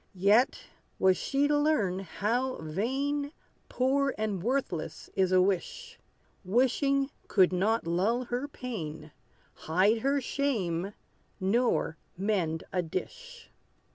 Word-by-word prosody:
Yet 205 +7 +3 0.3
was 190 -1 +4
she 280 +7 +1
to 295 - +2
learn 225 -12 +1
how 230 +8 -1
vain, 270 - -2 0.4
Poor 270 +2 +1
and 215 -4 -2
worthless, 235 - -2
is 190 -1 +2
a 185 - +5
wish. 465 - -2 0.4
Wishing 270 +6 +2 0.2
could 185 -2 +4
not 210 +4 +1
lull 195 +9 +1
her 245 +3 -3
pain, 165 - -6 0.4
Hide 190 +8 +2
her 275 +4 +1
shame, 205 -10 -1 0.5
nor 200 -4 +1 0.2
mend 180 -5 0
a 180 - +2
dish. 485 - -7
220 Hz, 110 wpm, -29 LUFS, 185-275 Hz, 0.5 s, a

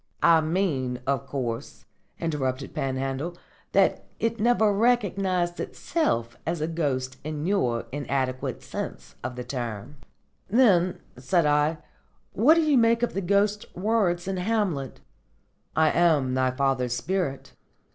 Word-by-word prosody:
"I 165 -1 +6
mean, 155 -7 -1
of 135 0 -1
course," 125 -4 -4 0.3
interrupted 135 -5 -2
Panhandle, 135 +5 -2 0.4
"that - - +3
it 230 0 -1
never 220 -2 +3
recognised 195 -6 +1
itself 120 - -1
as 165 +1 -2
a 155 - 0
ghost 130 -6 -2
in 155 0 -4
your 125 - +1
inadequate 130 -2 -2
sense - - -6
of 125 - -4
the 125 - -5
term." 120 0 -5 0.5
"Then," 190 -6 +4 0.2
said 150 +6 +1
I, 150 +2 +2 0.6
"what 270 +10 +5
do 330 - +3
you 295 -4 +4
make 230 +1 +3
of 240 - 0
the 195 - -1
Ghost's 200 +3 +1
words 185 -3 +1
in 195 -1 -2
Hamlet: 180 - -1 0.7
'I 160 -1 +4
am 155 -7 +3
thy 130 0 +2
father's 130 -2 0
spirit'? 155 +1 -2
160 Hz, 130 wpm, -26 LUFS, 130-195 Hz, 0.7 s, I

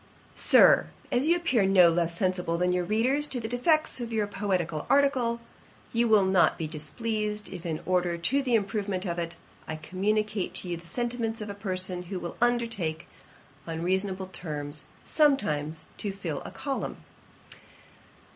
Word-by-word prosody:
'Sir, - - +6 0.2
'As 255 +3 +2
you 340 - +5
appear 265 - +2
no 190 -2 +6
less 170 0 0
sensible 180 -3 0
than 180 +1 +2
your 180 0 +1
readers 250 +10 +1
of - - 0
the - - -2
defects 255 +4 +1
of 235 -1 -4
your 220 -2 +1
poetical 185 -6 -2
article, 260 -5 +3 0.5
you 235 +1 +2
will 215 -3 +5
not 190 -1 +4
be 160 - -3
displeased, 210 +8 -3
if, 175 -2 -6
in 160 -2 -2
order 180 -1 +1
to 235 +12 +1
the 250 -3 +1
improvement 200 -3 -1
of 170 -1 -2
it, 170 0 -3 0.3
I 155 - -3
communicate 205 +5 -1
to - - 0
you 175 - -1
the 170 +1 -13
sentiments 235 0 -1
of 210 -1 -5
a - - -5
person, 185 -3 -2
who 180 +1 -5
will 170 - -6
undertake, 230 -10 0 0.6
on 165 0 -4
reasonable 190 +1 0
terms, 150 -4 -2 0.2
sometimes 160 - +1
to 205 - -2
fill 175 -7 -4
a - - -7
column. 270 +9 -4
195 Hz, 165 wpm, -28 LUFS, 170-230 Hz, 0.6 s, Sir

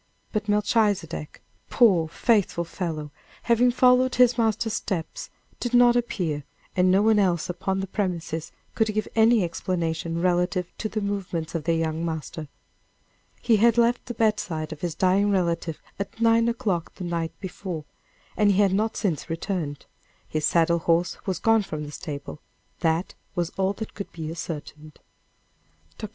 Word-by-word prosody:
But 215 -1 -2
Melchizedek, 205 -7 0 0.3
poor, 190 -9 +4
faithful 200 -1 +1
fellow, 160 -4 -4 0.3
having 240 +1 +4
followed 250 +1 +4
his 250 -1 +5
master's 225 -1 0
steps, 180 -7 -4 0.3
did 245 0 -1
not 240 0 +6
appear, 175 -11 -1 0.3
and 185 0 +4
no 195 +2 +4
one 220 -1 +4
else 180 -4 +1
upon 190 +2 -2
the - - -2
premises 170 -5 -3 0.2
could 220 -1 +1
give 215 - 0
any 225 -1 +5
explanation 165 -1 -2
relative 180 0 0
to 215 - -2
the 215 - -2
movements 190 -5 -3
of 165 -3 -3
their 165 -1 +2
young 160 0 -1
master. 160 -1 -4 1.0
He 225 -3 +4
had 230 +2 +4
left 235 +1 +2
the 240 - -5
bedside 180 -8 0
of 150 - -13
his 170 -3 -2
dying 190 +2 +3
relative 170 -4 0 0.2
at 200 +3 -5
nine 230 0 +4
o'clock 210 -8 -2
the 185 - -7
night 170 -2 -3
before, 180 -4 -6 0.5
and 205 -1 +4
he - - 0
had 200 -2 +4
not 215 +3 0
since 175 -5 -2
returned 165 -4 -3 0.4
his 155 -1 0
saddle 170 0 +3
horse 165 +1 +1
was 185 -3 0
gone 225 -1 +3
from 155 -6 -5
the 145 - -7
stable 150 -2 -7 0.4
that 165 +2 0 0.2
was 175 -1 -1
all 195 +1 0
that 220 +2 -7
could 200 - -7
be 160 -1 -5
ascertained. 155 -2 -7 1.0
Dr. - - -5
185 Hz, 160 wpm, -25 LUFS, 165-215 Hz, 1.0 s, not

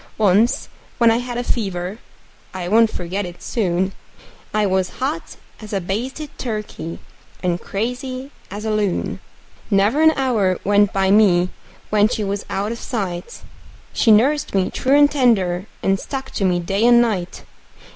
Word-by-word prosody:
Once 215 +3 +3 0.3
when 235 -1 +5
I 225 - +2
had 245 0 -4
a 245 - -1
fever 195 -4 -2 0.6
I 180 -2 -4
won't 225 +3 +5
forget 185 +2 -3
it 175 -1 -9
soon 190 -3 0 0.6
I 215 0 +1
was 190 -1 0
hot 295 +6 -3 0.2
as 215 -1 -9
a 195 - +1
basted 245 - -4
turkey 210 -8 -5 0.5
and 175 -1 0
crazy 255 +5 -4 0.2
as 205 +3 -6
a 220 - 0
loon; 210 -3 -1 0.5
Never 205 +8 +3
an 315 0 +6
hour 220 -9 +1
went 205 0 +3
by 195 0 +1
me 185 -4 +4 0.4
when 210 0 +4
she 225 -3 -2
was 200 0 -3
out 200 +3 -2
of 230 - -5
sight 185 -7 -4 0.5
She - - +2
nursed 260 +4 +3
me 190 -1 +1
true 270 +2 +2
and 290 0 +6
tender, 205 -9 +2 0.2
and 195 0 +2
stuck 265 +4 -6
to 195 - -1
me 180 -1 +2
day 195 +5 -1
and 240 0 +7
night. 200 -7 -1
210 Hz, 160 wpm, -20 LUFS, 190-240 Hz, 0.6 s, and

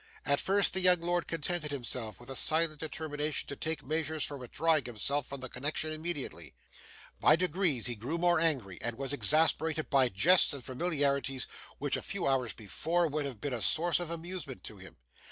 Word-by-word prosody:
At 140 0 +2
first, 200 0 +2
the 190 - +2
young 180 -1 +5
lord 175 0 -1
contented 165 0 -2
himself 120 -6 -3
with 120 +2 -11
a - - -5
silent 155 +1 +3
determination 155 -1 -2
to 140 - -5
take 155 -1 -3
measures 155 0 -1
for 145 - -3
withdrawing 150 +3 0
himself 125 +4 -1
from 140 -1 -7
the 130 - -5
connection 145 +5 -3
immediately. 155 -3 -5 0.6
By - - +6
degrees, 175 - +1
he 120 - +1
grew 120 +9 -4
more 175 0 +3
angry, 130 - 0
and 115 0 -3
was 135 0 -3
exasperated 155 +1 +3
by 135 -3 +4
jests 165 - +5
and 140 -3 -7
familiarities 140 -2 0 0.3
which, 145 0 -1
a - - -3
few 200 - -4
hours 130 -4 +1
before, 165 - -1
would 150 0 -2
have 125 -6 -8
been 140 +4 -3
a 120 - -3
source 170 +6 +2
of 175 -2 -4
amusement 170 -5 -5
to 110 - -8
him. 95 -3 -13
150 Hz, 190 wpm, -31 LUFS, 130-165 Hz, 0.6 s, By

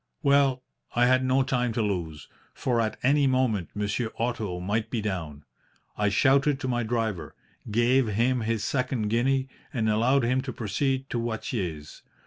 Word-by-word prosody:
"Well, 140 -2 +3 0.3
I 120 0 +4
had 130 +1 +3
no 130 +1 +3
time 125 -2 0
to 115 - 0
lose, 85 -8 -3 0.3
for 120 -3 0
at 110 -1 -2
any 140 +2 +4
moment 130 -8 +1
Monsieur 105 +3 -2
Otto 110 -6 -2
might 105 +5 -1
be 120 - -2
down. 85 -8 -4 0.5
I 105 0 +1
shouted 135 +6 +3
to 130 - -2
my 120 -1 0
driver, 110 -5 -2 0.3
gave 120 +3 +3
him 120 +5 +1
his 110 -1 -1
second 125 -4 -1
guinea, 130 +4 +1 0.2
and 115 -7 -1
allowed 120 +5 +3
him 130 +2 +1
to 130 -1 -5
proceed 130 +4 -1
to 120 - -1
Watier's. 100 -9 -4
120 Hz, 160 wpm, -26 LUFS, 105-130 Hz, 0.5 s, I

